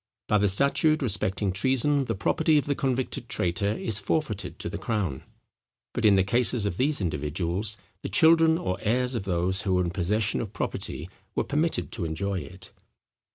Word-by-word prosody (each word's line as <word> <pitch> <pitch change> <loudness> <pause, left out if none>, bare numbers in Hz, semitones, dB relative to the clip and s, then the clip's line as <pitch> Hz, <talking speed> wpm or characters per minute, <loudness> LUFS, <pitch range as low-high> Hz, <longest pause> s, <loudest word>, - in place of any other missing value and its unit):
By 105 - +3
the 105 - +3
statute 140 +8 +3
respecting 100 -3 +1
treason 135 +6 +1
the 115 - -2
property 155 +10 +2
of 145 - +1
the 145 - 0
convicted 130 -2 -2
traitor 90 +3 -1
is 110 0 -1
forfeited 105 -1 -2
to - - -4
the 100 +4 -5
crown; 95 - -2 0.7
but 120 - -1
in 105 -2 +6
the 95 - +4
cases 120 +2 +2
of 95 -3 -2
these 140 0 +1
individuals 85 +6 -2 0.2
the - - -5
children 160 -1 +5
or 95 - -3
heirs 125 +4 +1
of 115 -5 -3
those 95 +1 0
who 95 -3 0
were 90 - +2
in 85 - -2
possession 100 +4 0
of 110 -3 -6
property 80 -5 -3 0.3
were - - +1
permitted 155 +3 -1
to 95 -7 -3
enjoy 95 +5 -2
it. 95 +1 -9
105 Hz, 180 wpm, -26 LUFS, 95-130 Hz, 0.7 s, in